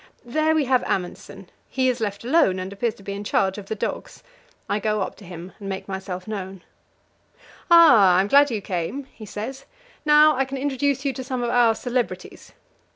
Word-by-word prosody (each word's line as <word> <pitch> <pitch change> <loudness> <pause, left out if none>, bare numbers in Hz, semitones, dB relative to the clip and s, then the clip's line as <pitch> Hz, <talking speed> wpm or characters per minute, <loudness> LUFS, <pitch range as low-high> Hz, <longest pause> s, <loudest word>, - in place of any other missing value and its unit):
There 310 +6 +1
we 305 -3 +2
have 255 -1 +2
Amundsen; 180 -2 -5 0.2
he 260 -1 0
is 250 -1 0
left 205 -2 -3
alone, 260 - +3
and 185 +1 -5
appears 220 +2 -2
to 200 - -17
be 200 - -5
in 200 +1 -6
charge 195 -1 0
of 195 - -11
the 220 - -3
dogs. - - -5 0.4
I 205 - -1
go 210 0 -1
up - - -5
to 200 - -14
him 175 +1 -9
and 200 -1 -7
make 190 0 -5
myself 190 -1 -6
known. 195 -3 -6 1.1
"Ah, 245 - +7
I'm 190 +2 +2
glad 285 +5 +5
you 220 -4 -3
came," 185 +9 -3
he 215 - -11
says; 265 +7 -6 0.4
"now 300 0 +6
I 270 - +1
can 270 +1 -6
introduce 280 0 -1
you 275 - 0
to 260 - -6
some 255 -1 -3
of 240 - -1
our 240 -2 +4
celebrities. 245 +1 -4
225 Hz, 200 wpm, -23 LUFS, 195-270 Hz, 1.1 s, Ah